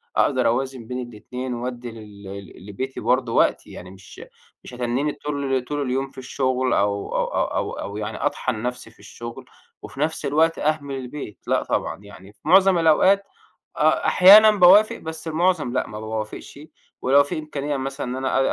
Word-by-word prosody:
أقدر - - +2
أوازن 130 -1 -2
بين 125 -1 -5
الاتنين 125 +4 -6
وادّي 120 0 -5
لل 100 -3 -11
لبيتي 130 +7 -5
برضه 125 -2 0
وقت - - +2
يعني 90 +1 -10
مش 95 -1 -14 0.4
مش - - -11
هاتنّيني 125 +4 -1
طول 140 -3 -2
طول 145 +1 -3
اليوم 135 +1 -2
في - - -25
الشغل 130 -1 -1
أو 100 0 -1
أو - - +1
أو - - -1
أو - - -2
أو 100 +1 -6
يعني 105 0 -4
أطحن 115 -4 -2
نفسي 125 0 -5
في - - -27
الشغل 120 0 -9 0.4
وفي 135 - -11
نفس 155 0 -1
الوقت 160 +4 +2
أهمل 145 -2 -1
البيت، 130 -4 -7
لأ - - +1
طبعًا - - -2
يعني 100 -1 -14
في - - -33
معظم 190 +2 +5
الأوقات 185 +5 +4 0.5
أ - - +2
أحيانًا 210 +4 +8
باوافق 200 +2 +6
بس 160 +1 -8
المعظم 160 -5 0
لأ، 130 - -1
ما 105 - -8
باوافقش 110 +4 -6 0.4
ولو 140 +2 +5
في 145 - -4
إمكانية 145 -2 -4
مثلًا 135 +2 -4
إن 125 - -4
أنا 130 0 0
130 Hz, 170 wpm, -22 LUFS, 115-150 Hz, 0.5 s, أحيانًا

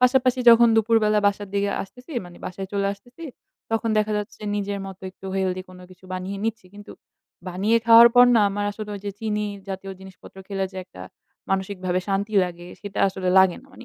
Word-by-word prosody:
পাশাপাশি 255 0 +3
যখন 235 0 +7
দুপুরবেলা 220 -1 +3
বাসার 205 0 -1
দিকে 200 0 +1
আসতেছি 250 - -13
মানে 175 0 -13
বাসায় 190 +1 -6
চলে 200 -1 0
আসতেছি 245 +10 -13 0.5
তখন 225 +1 0
দেখা 215 0 0
যাচ্ছে 210 +1 -7 0.2
নিজের 200 0 -3
মতো 190 -1 -11
একটু 190 - -13
healthy 185 -1 -1
কোন 185 0 -13
কিছু 185 0 -18
বানিয়ে 185 +2 -4
নিচ্ছি। 225 -4 -3
কিন্তু 205 - -11 0.6
বানিয়ে 200 +6 +1
খাওয়ার 230 +1 +9
পর 245 0 +8
না - - +5
আমার 205 +1 -3
আসলে 210 0 -7
ওই 200 - -7
যে 200 - -2
চিনি 210 -1 -1 0.2
জাতীয় 195 0 -6
জিনিসপত্র 190 0 -14
খেলে 195 -1 -2
যে - - -11
একটা 90 - -13 0.5
মানসিকভাবে 190 -2 -1
শান্তি 200 +2 -1
লাগে 175 -1 -8
সেটা 200 -1 -7
আসলে 190 -1 -4
লাগে 190 -2 +4
না। - - -20
মানে - - -13
200 Hz, 190 wpm, -23 LUFS, 190-225 Hz, 0.6 s, খাওয়ার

